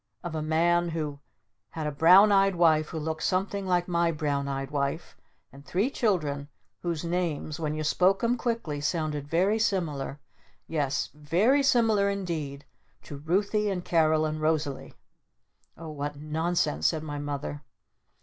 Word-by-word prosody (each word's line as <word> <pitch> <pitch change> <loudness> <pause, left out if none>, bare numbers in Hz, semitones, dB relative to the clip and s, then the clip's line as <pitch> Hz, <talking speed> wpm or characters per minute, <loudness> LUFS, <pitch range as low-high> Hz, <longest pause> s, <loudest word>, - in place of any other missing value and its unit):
" - - -48
Of 175 - -5
a 155 - -2
man 170 +2 +2
who 155 -3 -4 0.5
had 160 +3 -5
a 150 - -1
Brown 180 +8 +6
Eyed 195 -1 +4
Wife 160 -3 +3
who - - -5
looked 160 +1 -3
something 195 +1 -1
like 175 -1 +1
my 170 -1 +1
Brown 145 -3 -2
Eyed 135 0 -4
Wife 140 +3 -2 0.4
and 140 +1 -13
three 195 - 0
children 155 - -1 0.3
whose 170 -2 -3
names 165 -3 -2
when 155 -2 -2
you 155 - -3
spoke 185 +7 +2
'em 235 +1 +2
quickly 230 - -3
sounded 150 -2 -2
very 190 +8 +2
similar 155 -10 -1 0.5
yes, 145 -4 -1
very 175 - +2
similar 225 -6 +3
indeed 160 -8 -4 0.4
to 145 - -8
'Ruthy' 200 +7 0
and 180 -3 -3
'Carol' 155 -2 +3
and 155 0 -3
'Rosalee'!" 155 -3 -1 0.8
"Oh 165 -1 -8
what 145 -1 -4
nonsense!" 155 - 0
said 155 -1 -1
my 145 -2 -5
Mother. 145 0 -4
160 Hz, 155 wpm, -27 LUFS, 150-185 Hz, 0.8 s, Brown